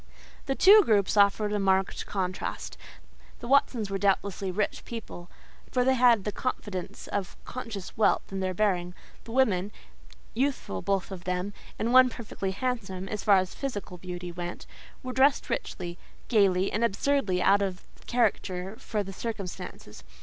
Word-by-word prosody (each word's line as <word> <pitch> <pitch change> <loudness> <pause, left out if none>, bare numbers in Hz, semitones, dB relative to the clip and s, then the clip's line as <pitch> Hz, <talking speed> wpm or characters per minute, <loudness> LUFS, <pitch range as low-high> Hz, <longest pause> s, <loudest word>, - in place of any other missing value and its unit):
The 270 - 0
two 410 +7 +8
groups 205 - +2
offered 205 +1 +4
a 210 - +1
marked 190 -1 +1
contrast. 185 -2 -3 0.6
The 240 - -7
Watsons 240 -6 +2
were 195 - -1
doubtless 200 0 +1
rich 195 +2 -1
people, 210 -6 -8 0.4
for 250 - +2
they 265 +1 +4
had 240 -5 +5
the 210 - -2
confidence 205 -6 -4
of 195 -3 -3
conscious 225 -7 -6
wealth 220 - +2
in 195 - -3
their 185 -1 -2
bearing; 180 -3 0 0.3
the 230 - -9
women—youthful 220 - -2
both 195 -1 -1
of 185 -2 -7
them, 180 +2 -2 0.2
and 230 +2 0
one 255 0 +8
perfectly 220 -5 -5
handsome, 195 -3 -3
as 210 -2 -4
far 200 -3 +6
as 185 -1 -1
physical 205 -9 -5
beauty 180 0 -6
went—were 175 +8 -8
dressed 270 +1 +3
richly, 175 -1 -4 0.3
gaily, 195 -4 +3
and 220 - 0
absurdly 230 -3 +1
out 200 +2 +4
of 190 -2 -2 0.2
character 195 -5 0
for 210 -2 -2
the 195 0 -8
circumstances. 195 - -6
200 Hz, 150 wpm, -28 LUFS, 185-235 Hz, 0.6 s, two